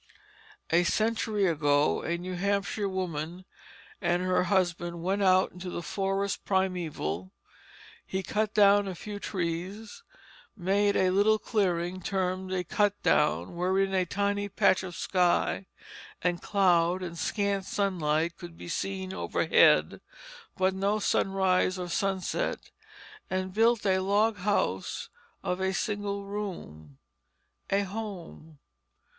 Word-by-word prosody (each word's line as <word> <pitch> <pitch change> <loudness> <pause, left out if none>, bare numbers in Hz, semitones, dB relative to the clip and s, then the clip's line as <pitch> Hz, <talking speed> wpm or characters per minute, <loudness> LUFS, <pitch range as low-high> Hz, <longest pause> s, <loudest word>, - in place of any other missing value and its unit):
A 170 +2 +4
century 215 +1 +1
ago 145 -3 +2
a 170 +1 -2
New 180 +1 -6
Hampshire 200 +2 -1
woman 180 -1 -4 0.6
and 175 -1 +1
her 185 0 +2
husband 175 -3 0
went 195 +3 0
out 185 -1 +4
into 180 +1 -7
the 175 - -5
forest 195 +2 -2
primeval; 165 - -2 0.7
he 190 0 -3
cut 215 +2 -1
down 205 -1 +5
a 190 - -4
few 205 +3 -7
trees, 190 +4 -4 0.6
made 200 +2 +2
a 185 -1 +3
little 205 +3 +4
clearing 185 -4 -1
termed 185 0 -2
a 185 -1 -1
cut 205 +2 +1
down 150 +3 +2
wherein 190 +2 +1
a 185 -1 +1
tiny 205 +2 -1
patch 190 -1 +3
of 180 -2 -7
sky 180 +1 +1 0.6
and 175 -1 0
cloud 180 -2 +2
and 170 -2 -5
scant 200 -1 -1
sunlight 170 -5 0
could 170 -2 -10
be - - -9
seen 190 +1 -3
overhead, - - +3 0.6
but 190 0 +2
no 200 +2 0
sunrise 190 -2 +1
or 180 -1 -4
sunset, 190 0 -2 0.6
and 185 0 -2
built 225 +1 +3
a 190 -1 +3
log 205 +3 +2
house 200 +2 -1 0.3
of 180 -1 -2
a 190 0 +1
single 205 -1 -2
room 170 - -7 0.7
a 200 - +2
home. 190 -6 -7
190 Hz, 125 wpm, -28 LUFS, 175-200 Hz, 0.7 s, down